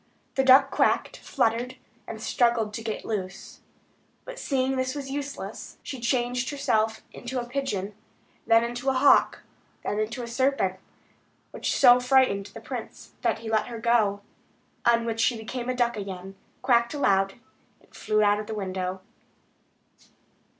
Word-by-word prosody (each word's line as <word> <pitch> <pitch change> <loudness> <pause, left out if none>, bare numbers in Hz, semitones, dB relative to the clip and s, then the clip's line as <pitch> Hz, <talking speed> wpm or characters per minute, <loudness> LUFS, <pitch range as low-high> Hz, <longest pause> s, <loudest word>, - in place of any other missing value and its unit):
The 270 - +2
duck 270 +1 +6
quacked, - - +1
fluttered, 235 +3 -1 0.3
and - - -6
struggled 235 -4 +1
to 225 - -5
get 220 -1 -4
loose. 190 -4 -5 0.7
But - - -8
seeing 265 -1 0
this 260 +1 -1
was 275 -2 -5
useless 285 0 -6
she 265 - -6
changed 245 +1 0
herself 220 -6 0
into 250 +1 -4
a 240 - -4
pigeon, 225 -7 -3 0.5
then 230 0 +5
into 240 +3 -2
a - - +2
hawk, 260 +2 +4 0.4
and 210 - -2
then 215 - +2
into 240 +2 -6
a - - -6
serpent, 235 -6 0 0.7
which - - -2
so 250 -2 +7
frightened 250 -6 +3
the - - -11
prince, - - -8
that - - +1
he - - -3
let 215 -1 +1
her 235 -2 -6
go; 220 -3 +2 0.7
on 235 -1 +4
which 225 -1 -3
she 235 +1 +2
became 240 +3 -5
a 255 - 0
duck 240 -1 +1
again, 195 -2 -6 0.3
quacked 235 +1 +3
aloud, 195 -8 +2 0.4
and - - -27
flew 215 0 +1
out 205 0 +3
of 210 - -6
the 220 - -4
window. 185 -2 -3
235 Hz, 155 wpm, -26 LUFS, 215-260 Hz, 0.7 s, so